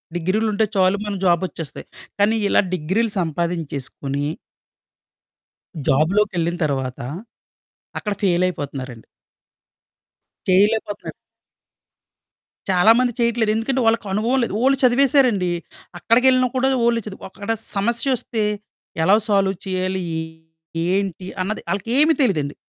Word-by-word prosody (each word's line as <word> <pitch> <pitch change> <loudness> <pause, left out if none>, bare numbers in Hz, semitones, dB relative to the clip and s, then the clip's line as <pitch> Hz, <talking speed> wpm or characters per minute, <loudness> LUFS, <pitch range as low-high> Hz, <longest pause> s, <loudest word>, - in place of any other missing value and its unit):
డిగ్రీలుంటే 210 +5 +1
చాలు 190 +1 +3
మనకు 200 -2 -4
జాబొచ్చేస్తాయి. 170 -3 -1 0.3
కానీ 210 +3 +3
ఇలా - - +4
డిగ్రీలు 190 +7 0
సంపాదించేసుకొని... 155 -4 -3 1.6
జాబులోకెళ్ళిన 175 +3 +1
తర్వాత, 135 -3 -2 1.0
అక్కడ 210 -3 -2
ఫెయిలయిపోతన్నారండి. 145 - -1 1.4
చెయ్యలేపోతన్నారు. 205 +2 +1 1.6
చాలామంది 225 +7 +4
చెయ్యట్లేదు. 235 -2 +1
ఎందుకంటే, 260 +4 0
వాళ్ళకనుభవం 225 +3 +1
లేదు. 215 - -4
ఓన్లీ 270 +1 +3
చదివేశారండి. 250 -7 +3 0.5
అక్కడికెళ్ళినా 255 +5 +4
కూడా 265 +1 +2 0.2
ఓన్లీ 235 -1 +2
చదువు. 200 - -9
అక్కడ 200 +3 -8 0.3
సమస్యొస్తే 235 +2 0 0.6
ఎలా 190 +5 +5
సాల్వ్ 195 -2 +2
చెయ్యాలి, 185 0 -2 0.9
ఏంటి 190 -1 -1 0.2
అన్నది 210 +4 -3
ఆళ్ళకేమీ 260 +11 +3
తెలీదండి. 150 - 0
200 Hz, 85 wpm, -21 LUFS, 175-230 Hz, 1.6 s, ఎలా